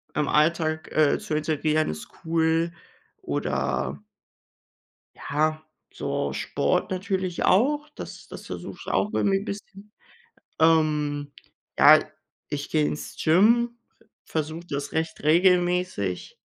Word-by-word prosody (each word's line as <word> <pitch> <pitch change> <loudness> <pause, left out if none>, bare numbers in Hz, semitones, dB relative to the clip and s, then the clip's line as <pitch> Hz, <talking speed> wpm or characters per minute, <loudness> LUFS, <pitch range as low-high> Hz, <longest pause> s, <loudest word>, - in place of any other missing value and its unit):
im 150 -1 +1
Alltag, 160 +1 +1
äh, 155 -2 +3
zu 150 - -3
integrieren, 155 0 0
ist 75 0 -8 0.2
cool. 165 +1 +1 0.5
Oder 70 +2 -2 1.1
Ja, 155 +2 -1 0.3
so - - -2
Sport - - -1
natürlich 185 -2 -2
auch, 290 +9 +3
das - - -9
das - - -10
versuche - - -7
ich - - -3
auch 210 - +2
irgendwie 195 -1 +2
'n 200 - -8
bisschen. 200 0 -8 0.7
Ähm, 150 -3 +2 0.5
ja, 155 +1 +9 0.5
ich 145 -1 -4
gehe 155 -1 +2
ins 150 - -4
Gym, 235 +8 +4 0.5
versuche 160 +2 -4
das 140 0 -3
recht 160 0 -2
regelmäßig. 175 - +2
160 Hz, 115 wpm, -25 LUFS, 150-185 Hz, 1.1 s, ja